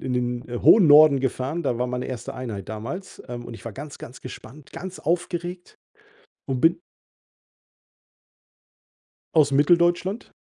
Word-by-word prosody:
den - - -19
in 130 - -3
den, 125 0 -2
äh, 120 0 -4
hohen 210 -6 +7
Norden 150 -1 +8
gefahren, 135 +5 -2
da 120 - 0
war 125 - 0
meine 125 0 -3
erste 125 -3 -6
Einheit 110 -7 -6
damals, 120 - -7
ähm, 120 -1 -6
und 120 - -8
ich 115 - -12
war 115 - -6
ganz, 145 +4 -9
ganz 125 - -11
gespannt, 130 +3 -11
ganz 185 0 -7
aufgeregt 175 +2 -3 0.7
und 130 -2 -2
bin 165 +1 +4 2.6
aus 150 -3 +5
Mitteldeutschland. 175 +8 +2
140 Hz, 150 wpm, -24 LUFS, 125-170 Hz, 2.6 s, Norden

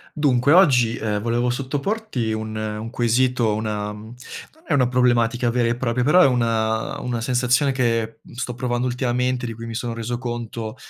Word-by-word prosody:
Dunque 140 -2 +3
oggi, 125 -11 +5
ehm, 105 -2 -2
volevo 120 +2 0
sottoporti 140 - -2
un 110 0 -4
un 110 +1 -4
quesito, 120 -1 +1
una 105 -1 -3
mhmm, 110 +2 -11 0.4
non 320 +1 -25
è - - 0
una 130 -3 +3
problematica 120 -1 +2
vera 120 0 +1
e 120 - 0
propria, 125 0 -1
però 150 +8 +5
è - - +7
una 115 -3 0
una 120 -2 -3
sensazione 125 +3 +2
che, 115 -3 -1
mhmm, - - -16
sto 125 0 -4
provando 120 0 -1
ultimamente, 125 0 -1
di 115 - -4
cui 115 +1 -9
mi 115 -1 -6
sono 120 0 -3
reso 115 +1 -4
conto 120 -2 -5
120 Hz, 180 wpm, -22 LUFS, 115-125 Hz, 0.4 s, è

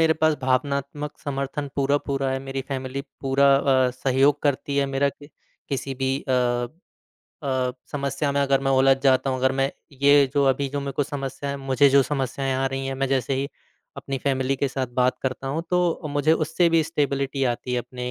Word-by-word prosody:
मेरे 160 -1 +5
पास 155 -1 +4
भावनात्मक 140 +3 -1
समर्थन 140 0 -3
पूरा-पूरा 140 -1 0
है। 135 - -1
मेरी 135 0 -4
फ़ैमिली 130 0 -3 0.2
पूरा 135 +1 +3
अ, 130 -2 +3
सहयोग 135 +3 +2
करती 140 0 0
है 140 -1 +2
मेरा 135 +1 +1
कि 145 +1 -11 0.4
किसी 135 -1 -3
भी 130 0 -1 0.2
अ - - +2 1.1
अ, 130 -2 0 0.2
समस्या 140 0 -1
में 140 - +1
अगर 135 -1 +2
मैं 135 0 0
उलझ 135 0 +5
जाता 130 0 +3
हूँ, 130 - -1
अगर 130 +1 +2
मैं 135 +1 +2 0.3
ये 140 0 +6
जो 140 -1 +3
अभी 140 +1 -3
जो 140 +1 -3
मेरे 140 0 -4
को 145 - 0
समस्या 140 -1 -4
है 140 - -3
मुझे 135 +1 +3
जो 140 0 +6
समस्याएँ 135 -1 -2
आ 135 - 0
रही 135 0 -3
हैं, 135 - -3
मैं 135 +1 -1
जैसे 135 0 0
ही 135 +1 -2 0.5
अपनी 135 -1 -4
फ़ैमिली 135 0 +1
के 140 +1 0
साथ 130 0 -2
बात 125 0 +2
करता 130 0 -3
हूँ 160 +4 -2
तो 175 -3 +1
मुझे 145 +2 +3
उससे 165 +2 +2
भी 165 -1 +4
स्टेबिलिटी 140 -3 -1
आती 125 - -7
है 125 - +1
अपने 125 +1 -5
135 Hz, 200 wpm, -24 LUFS, 130-140 Hz, 1.1 s, ये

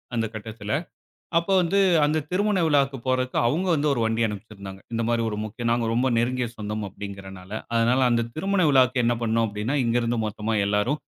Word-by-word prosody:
அந்த 115 -1 +1
கட்டத்தில. 110 0 -5 0.7
அப்ப 170 +3 -4
வந்து, 180 +3 +1 0.3
அந்த 150 +2 +1
திருமண 200 +2 +1
விழாவுக்கு 140 -3 +2
போறதுக்கு 130 0 0
அவுங்க 165 +10 0
வந்து 150 0 +1
ஒரு 120 - -2
வண்டி 115 +1 0
அனுப்பிச்சிருந்தாங்க. 100 -2 -8
இந்தமாரி 115 0 0
ஒரு 105 - -4
முக்கியம் 115 +2 -3
நாங்க 120 -1 0
ரொம்ப 130 +2 +2
நெருங்கிய 125 +1 0
சொந்தம் 105 0 -4
அப்பிடிங்கிறனால. 95 -1 -9 0.2
அதனால 120 +3 +3
அந்த 115 -1 +2
திருமண 195 +3 0
விழாவுக்கு 130 -2 +4
என்ன 120 +1 +2
பண்னோம் 115 0 +1
அப்பிடின்னா, 105 +7 -2
இங்க 115 +1 +1
இருந்து 115 0 -1
மொத்தமா 110 +1 -3
எல்லாரும் 105 +9 0
115 Hz, 170 wpm, -24 LUFS, 105-130 Hz, 0.7 s, விழாவுக்கு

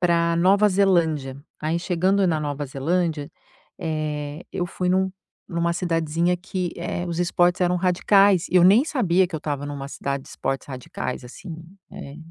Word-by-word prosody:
pra 170 -1 +2
Nova 195 +5 +4
Zelândia, 165 -9 +1 0.2
aí, 160 +2 0
chegando 185 +3 +1
na 160 -3 +1
Nova 145 -1 -3
Zelândia, 150 +2 -1 0.5
eh, 155 -1 -3
eu 175 - -2
fui 180 +1 -3
num 190 +1 +2 0.4
numa 170 0 0
cidadezinha 170 0 0
que, 180 -1 -4
eh, 175 +1 -3
os 170 0 -3
esportes 175 +1 +2
eram 180 0 +2
radicais 185 +1 +3
e 180 - +3
eu 175 - +7
nem 210 +9 +6
sabia 190 - +2
que 175 - -11
eu - - -1
estava 145 -2 -3
numa 140 -1 -6
cidade 140 -1 -4
de - - -15
esportes 135 +1 -4
radicais, 130 0 -5
assim, 130 +9 -10 0.4
eh, 140 +1 -9
170 Hz, 165 wpm, -23 LUFS, 150-180 Hz, 0.5 s, eu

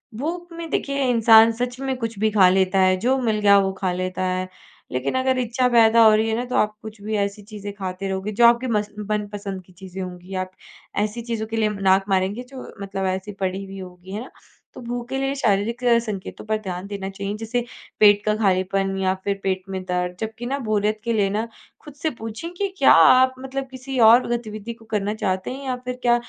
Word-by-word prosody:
भूख 335 +8 -4
में 335 -1 -6
देखिए 275 -2 -1
इंसान 225 -1 +7
सच 245 +2 -4
में 270 -1 -2
कुछ 230 -2 -4
भी 220 +1 +3
खा 190 -3 +6
लेता 190 0 +2
है, 185 0 +4
जो 255 +7 +1
मिल 220 -3 0
गया 200 -1 +6
वो 195 0 +1
खा 185 -1 +1
लेता 185 +1 -3
है। 185 0 -1 0.4
लेकिन 130 - -2
अगर 260 0 +1
इच्छा 250 +1 +1
पैदा 230 -1 +5
हो 215 - +7
रही 220 +1 +1
है 220 - 0
ना, 240 - -1
तो 250 - -4
आप 210 0 +2
कुछ 220 -1 -10
भी 215 +1 -3
ऐसी 200 +1 -2
चीज़ें 205 -1 -8
खाते 190 -1 -5
रहोगे 190 +2 -3
जो 235 +3 +4
आपके 240 +2 +5
मस 210 -2 0 0.2
मनपसंद 205 -2 -3
की 185 - -21
चीज़ें 190 +1 -8
होंगी, 180 0 -8
आप 185 0 -3 0.5
ऐसी 215 +3 -3
चीज़ों 230 -2 -4
के 225 - -5
लिए 220 -1 +2
अम, 210 - -5
नाक 190 0 +4
मारेंगे 195 +5 0
जो 265 -2 -9 0.2
मतलब 195 -1 -3
ऐसी 190 +2 -3
पड़ी 190 0 -2
हुई 195 0 -9
होगी, 180 0 -11
है 210 +3 -4
ना। - - -13 0.4
तो - - -10
भूख 240 0 -5
के 270 - -2
लिए 270 +1 -1
शारीरिक 230 0 0
अ, 240 -1 +5
संकेतों 215 -3 -6
पर 215 0 0
ध्यान 185 -1 -5
देना 195 -1 -5
चाहिए 200 +1 -4
जैसे 235 +2 -2 0.3
पेट 205 -1 +6
का 210 0 +2
खालीपन 195 -1 +1
या 190 -1 +1
फिर 200 -1 -1
पेट 190 -1 -1
में 190 -1 -4
दर्द। 180 0 -2
जबकि 220 +2 -5
ना 275 +3 -2
बोरियत 215 0 +1
के 235 - 0
लिए 205 -3 +2
ना, 215 +3 -2 0.3
खुद 295 - -12
से 315 - +2
पूछें 225 +10 -6
कि 400 +3 -1
क्या 275 - +6
आप 255 +11 +7
मतलब 265 +1 -5
किसी 260 0 -5
और 240 +2 +6
गतिविधि 215 0 -7
को 225 -1 -19
करना 205 +1 0
चाहते 185 +4 -1
हैं 275 +1 -8
या 255 - 0
फिर 250 0 -4
क्या 240 -1 +4
215 Hz, 230 wpm, -22 LUFS, 195-240 Hz, 0.5 s, इंसान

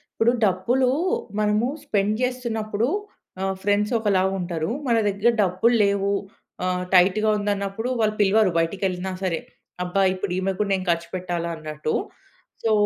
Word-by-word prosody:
ఇప్పుడు 230 +2 +3
డబ్బులు 240 +8 +2 0.5
మనము 210 +3 +2 0.2
స్పెండ్ 205 0 +1
జేస్తున్నప్పుడు 235 -3 -1 0.5
ఆ! - - 0 0.2
ఫ్రెండ్స్ 205 +2 +1
ఒకలా 200 -4 +2 0.2
ఉంటరు. 175 -1 -2 0.2
మన 230 -1 +3
దగ్గర 200 +4 +2
డబ్బు‌ల్లేవు 200 +1 +2 0.5
ఆ! - - +1 0.3
టైట్‌గా 190 +4 +5
ఉందన్నప్పుడు 205 +3 -2
వాళ్ళు 215 0 +1
పిలవరు 205 -1 +4
బయటికెళ్ళినా 185 +2 -1
సరే. 170 -3 0 0.5
అబ్బా! 195 +2 +1
ఇప్పుడు 185 -1 -3
ఈమె‌ 190 +1 0
గూడా 205 -1 0
నేను 190 0 -1
ఖర్చు 170 0 -2
పెట్టాలా 175 -2 -3
అన్నట్టు. 155 0 -3 0.7
సో, 225 - +2
200 Hz, 130 wpm, -24 LUFS, 185-215 Hz, 0.7 s, టైట్‌గా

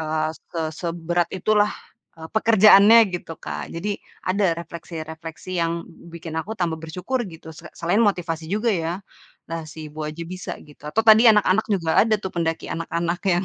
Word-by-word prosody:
eee 155 0 -1 0.2
ke 165 - -4
seberat 170 +1 -2
itu 190 +4 0
lah, 210 0 +4 0.5
eee, 160 0 -9
pekerjaannya 215 0 +7
gitu, 170 -2 -5
Kak. - - -6
Jadi, 200 +4 -3 0.2
ada 200 +2 +1
refleksi-refleksi 165 0 -8
yang 165 0 +1 0.4
bikin 170 -1 -8
aku 210 +7 -7
tambah 165 -4 -2
bersyukur, 180 +11 -3
gitu, 160 -1 -11
se - - -12
selain 175 +6 +1
motivasi 170 -7 0
juga 215 +4 +1
ya. 165 -3 -1 0.6
Lah, 165 -1 -4
si 155 0 -8
ibu 155 - -8
aja 155 +2 -6
bisa, 185 +2 -6
gitu. 150 0 -18
Atau 225 +8 0
tadi 225 +1 +8
anak-anak 210 -1 +4
juga 180 -6 0
ada 220 0 +3
tuh, 190 - -5
pendaki 165 -1 -2
anak-anak 170 +1 -2
yang 175 +2 +1
170 Hz, 170 wpm, -23 LUFS, 160-205 Hz, 0.6 s, tadi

